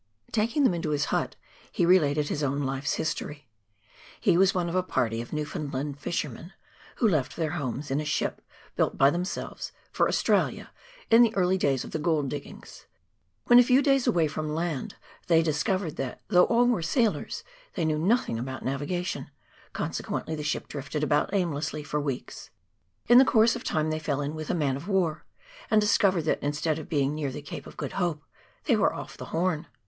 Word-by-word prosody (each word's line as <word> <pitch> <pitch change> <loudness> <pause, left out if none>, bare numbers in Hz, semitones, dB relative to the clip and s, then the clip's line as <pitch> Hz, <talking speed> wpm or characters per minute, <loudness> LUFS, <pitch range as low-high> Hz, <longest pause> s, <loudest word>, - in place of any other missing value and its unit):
Taking 230 +6 +1
them 255 - +4
into 165 -2 -2
his 145 -2 +1
hut - - 0 0.4
he 175 - +1
related 150 -5 +3
his 150 - -2
own 140 0 0
life's 135 +1 -1
history. 145 -3 -4 0.7
He - - +3
was 190 +2 +5
one 175 -2 0
of 170 - -3
a 185 - +2
party 115 -10 -1
of 120 - -9
Newfoundland 145 -2 -4
fishermen, 155 +2 -4 0.4
who 235 - +2
left 155 -10 0
their 160 -3 -1
homes, 145 -3 -4
in 140 +3 +1
a - - -5
ship 155 - -1 0.3
built - - 0
by 135 +1 +5
themselves, 180 +3 -4 0.2
for - - +2
Australia, - - +1 0.4
in 230 +1 +8
the 230 -2 +4
early 185 -1 +3
days 140 -8 +1
of - - -9
the 160 - -2
gold 150 -3 +1
diggings. 145 0 -9 0.6
When 245 0 +8
a - - +8
few 255 +3 +4
days 275 -3 +3
away 170 -9 +3
from 155 0 -3
land, 165 -5 -3 0.3
they 165 -1 +5
discovered 160 +2 -1
that, 130 -2 -4
though 180 -4 +6
all 235 +1 +3
were 245 -7 +2
sailors, 220 +6 0 0.3
they 165 - 0
knew 155 -1 +1
nothing 180 - +1
about 130 +2 -5
navigation; 145 +7 -3 0.4
consequently 160 - -3
the 155 - -4
ship 150 0 -2
drifted 150 +1 -4
about 150 +3 +1
aimlessly 160 -5 -1
for 150 0 -2
weeks. 140 -3 -5 0.6
In 245 +3 +8
course 230 -2 +4
of - - -6
time 155 0 0
they 155 - -1
fell 145 -2 -2
in 145 +1 -3
with 155 -1 -6
a - - +1
man 140 -5 0
of 155 +7 -9
war, 175 -5 0 0.4
and 215 -3 +5
discovered 200 -4 +3
that, 155 - 0
instead 150 +2 -1
of 155 - -9
being 140 -2 +1
near 150 -3 -2
the 145 +2 -7
Cape - - -8
of - - -13
Good 145 - -4
Hope, 165 -4 -1 0.4
they - - +3
were - - +3
ofi" - - -8
the - - -7
Horn. 170 -1 -1
155 Hz, 195 wpm, -27 LUFS, 145-185 Hz, 0.7 s, in